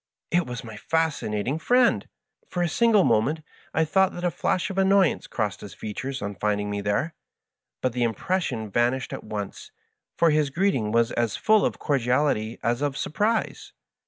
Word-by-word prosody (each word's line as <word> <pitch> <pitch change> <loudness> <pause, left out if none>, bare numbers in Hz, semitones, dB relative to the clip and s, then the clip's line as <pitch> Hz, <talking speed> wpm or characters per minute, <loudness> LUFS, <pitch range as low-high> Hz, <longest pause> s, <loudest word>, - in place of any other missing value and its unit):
It 175 0 +2
was 125 -1 -5
my 110 -2 -9
Fascinating 145 -4 -1
I>Viend 245 +3 +3
I - - -26 0.4
For 175 -1 -1
a - - +2
single 215 +3 +4
moment 130 +8 +2 0.3
I 160 - +2
thought 190 +4 +2
that 175 - -7
a 175 - +1
flash 185 +3 -1
of 195 - -2
annoyance 195 -2 +3
crossed 105 -4 -2
his 100 - -9
features 125 +4 -5
on 100 0 -3
finding 105 +1 -1
me 100 0 -2
there, 105 +11 -1 0.7
but 130 - 0
the 125 - -2
impression 120 - -1
vanished 120 +4 0
at - - -6
once, 105 -2 -6 0.5
for 165 -1 +4
his 150 -1 +2
greeting 140 - 0
was 115 +1 +2
as 115 -3 0
full 215 -1 +4
of - - 0
cordiality 125 -4 0
as 120 +3 0
of 145 -1 -1
surprise. 215 +7 -1
135 Hz, 175 wpm, -25 LUFS, 110-175 Hz, 0.7 s, single